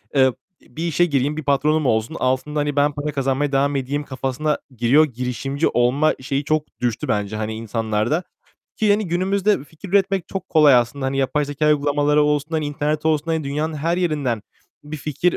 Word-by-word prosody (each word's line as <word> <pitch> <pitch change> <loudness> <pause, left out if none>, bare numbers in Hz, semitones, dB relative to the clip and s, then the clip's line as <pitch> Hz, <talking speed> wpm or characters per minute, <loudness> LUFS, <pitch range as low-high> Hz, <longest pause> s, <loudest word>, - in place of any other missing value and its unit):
eee, 130 -1 +5 0.3
bir 165 +2 -5
işe 170 +2 +3
gireyim, 145 0 0
bir 155 - -4
patronum 150 +2 +2
olsun, 110 +6 0
altında 130 +4 0
hani 145 -1 -1
ben 145 +1 +3
para 145 +1 -4
kazanmaya 135 0 0
devam 140 +1 +1
edeyim 140 +2 -2
kafasına 135 +3 -2 0.2
giriyor. 135 +7 +5
Girişimci 130 +3 -2
olma 130 +6 +2
şeyi 140 +2 -2
çok 155 +1 +1 0.2
düştü 120 -3 -1
bence 105 0 -1
hani 110 0 -3
insanlarda. 115 - -1 0.5
Ki 215 -2 +2
hani 205 -1 +2
günümüzde 190 0 +1
fikir 160 +6 -12
üretmek 195 -1 +1
çok 195 - -5
kolay 150 -4 +6
aslında. 125 +3 +1
Hani 135 +1 -1
yapay 145 +2 +1
zekâ 145 +1 -2
uygulamaları 145 0 +2
olsun, 150 +1 0
hani 155 -2 -1
internet 150 +1 -2
olsun, 155 -1 +2
hani 160 -2 -1
dünyanın 150 +3 -2
her 165 +4 0
yerinden 145 - -1 0.4
bir 150 +1 -6
fikir 150 +5 -1
145 Hz, 180 wpm, -21 LUFS, 130-155 Hz, 0.5 s, kolay